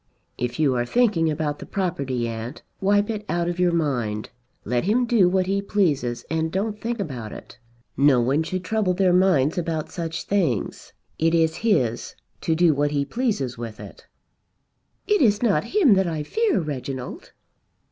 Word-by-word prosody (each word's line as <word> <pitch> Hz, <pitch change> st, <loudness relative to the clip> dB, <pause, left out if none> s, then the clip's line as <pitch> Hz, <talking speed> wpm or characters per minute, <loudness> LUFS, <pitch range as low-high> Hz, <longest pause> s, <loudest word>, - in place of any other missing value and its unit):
"If 120 Hz, 0 st, -2 dB
you 145 Hz, -4 st, +3 dB
are 120 Hz, -1 st, 0 dB
thinking 185 Hz, -, +2 dB
about 150 Hz, -1 st, -2 dB
the -, -, -8 dB
property, 140 Hz, -10 st, -2 dB
aunt, 115 Hz, +4 st, -6 dB, 0.2 s
wipe 205 Hz, +1 st, +2 dB
it 210 Hz, -1 st, -4 dB
out 170 Hz, 0 st, 0 dB
of 175 Hz, 0 st, -3 dB
your 180 Hz, -1 st, +3 dB
mind. 125 Hz, -10 st, -1 dB, 0.3 s
Let 120 Hz, +5 st, 0 dB
him 235 Hz, +5 st, +2 dB
do 220 Hz, -7 st, +4 dB
what 185 Hz, 0 st, +1 dB
he 195 Hz, +1 st, 0 dB
pleases 150 Hz, -, 0 dB
and 160 Hz, 0 st, -1 dB
don't 210 Hz, +3 st, -2 dB
think 235 Hz, 0 st, -3 dB
about 125 Hz, -, -5 dB
it. -, -, -11 dB, 0.4 s
No 140 Hz, -1 st, +4 dB
one 135 Hz, +6 st, +2 dB
should 185 Hz, +3 st, -3 dB
trouble 210 Hz, -4 st, 0 dB
their 185 Hz, -1 st, +3 dB
minds 180 Hz, -4 st, +3 dB
about 160 Hz, -2 st, -3 dB
such 165 Hz, -2 st, -4 dB
things. 170 Hz, -, -1 dB, 0.3 s
It 165 Hz, +1 st, +3 dB
is 160 Hz, 0 st, +2 dB
his, 130 Hz, -, 0 dB, 0.3 s
to 160 Hz, -, +1 dB
do 170 Hz, -1 st, +4 dB
what 145 Hz, +1 st, +1 dB
he 145 Hz, -1 st, 0 dB
pleases 145 Hz, -, -2 dB
with 115 Hz, -2 st, -7 dB
it." -, -, -12 dB, 1.0 s
"It 415 Hz, -2 st, +2 dB
is 210 Hz, -3 st, +3 dB
not 200 Hz, -10 st, +2 dB
him 360 Hz, -, +4 dB
that 190 Hz, -1 st, +2 dB
I 160 Hz, -3 st, -2 dB
fear, 440 Hz, -, +1 dB
Reginald." 135 Hz, -5 st, -6 dB
165 Hz, 175 wpm, -23 LUFS, 135-200 Hz, 1.0 s, do